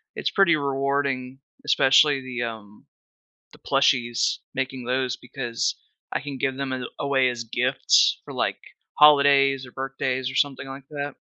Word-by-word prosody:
it's - - -1
pretty 190 -5 +4
rewarding, 135 -2 -2 0.3
especially 140 -1 +4
the, 125 -2 -5
um 110 -3 -8 0.7
the - - -17
plushies, 120 -1 +1 0.2
making 130 -2 -4
those, 130 0 -1
because 120 -1 -3 0.4
I - - -2
can 140 -2 -7
give 135 0 -1
them 135 -1 -3
a 125 -1 -4
away 135 -3 +2
as 120 -1 -5
gifts 115 - +2
for, - - -9
like, - - -1 0.4
holidays, 140 -2 +5
or - - -14
birthdays, 130 -1 -3
or 130 - -10
something 135 -1 0
like 135 0 -10
that. 145 -1 -5
135 Hz, 150 wpm, -24 LUFS, 125-140 Hz, 0.7 s, holidays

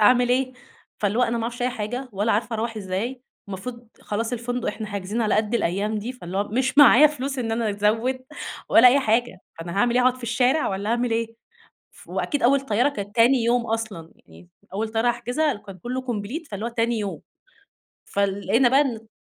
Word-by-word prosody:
أعمل 245 +3 +5
إيه؟" 255 +1 +1 0.5
فاللي 205 +3 0
هو - - +4
أنا 235 -1 +1
معرفش 235 +2 -4
أي 250 - +2
حاجة 245 +3 -4
ولا 205 +3 0
عارفة 225 +2 -1
أروَّح 225 0 -3
إزاي. 210 +6 -3 0.3
المفروض 235 +4 -7
خلاص 225 +3 -3
الفندق 245 0 -2
إحنا 220 - -4
حاجزين 205 +2 -3
على 215 - +1
قد 215 +2 0
الأيام 210 +1 0
دي، 235 +5 -5
فاللي 185 -7 -7
هو 205 - -1
مش 260 +5 0
معايا 290 +1 +9
فلوس 275 -2 -4
إن 225 -2 -2
أنا 225 -2 0
أزوِّد 225 +6 0 0.4
ولا 250 +2 +8
أي 275 +3 +4
حاجة، 230 -4 0 0.2
فأنا 170 +1 -6
هاعمل 240 +3 +2
إيه؟ 250 - +4
هاقعد 255 0 +3
في 255 - -15
الشارع 245 +6 +1
والّا 200 +2 -3
أعمل 240 0 0
إيه؟ 230 0 0 0.7
ف - - -18
وأكيد 290 -4 -2
أول 275 +3 +4
طيارة 245 +1 +1
كانت 205 -6 -7
تاني 240 +1 +4
يوم 235 0 +2
أصلًا. 220 -7 -4
يعني 85 +1 -17 0.2
أول 220 +2 -2
طيارة 225 +2 +1
أحجزها 245 +6 0
كان 195 -2 -11
كُلّه 250 +4 -4
complete، 250 +6 -5
فاللي 205 +3 -4
هو - - -2
تاني 235 -1 0
يوم. 200 -2 -4 0.8
فلقينا 200 +5 +1
بقى 270 +3 +4
إن 225 -6 -2
230 Hz, 195 wpm, -24 LUFS, 210-250 Hz, 0.8 s, معايا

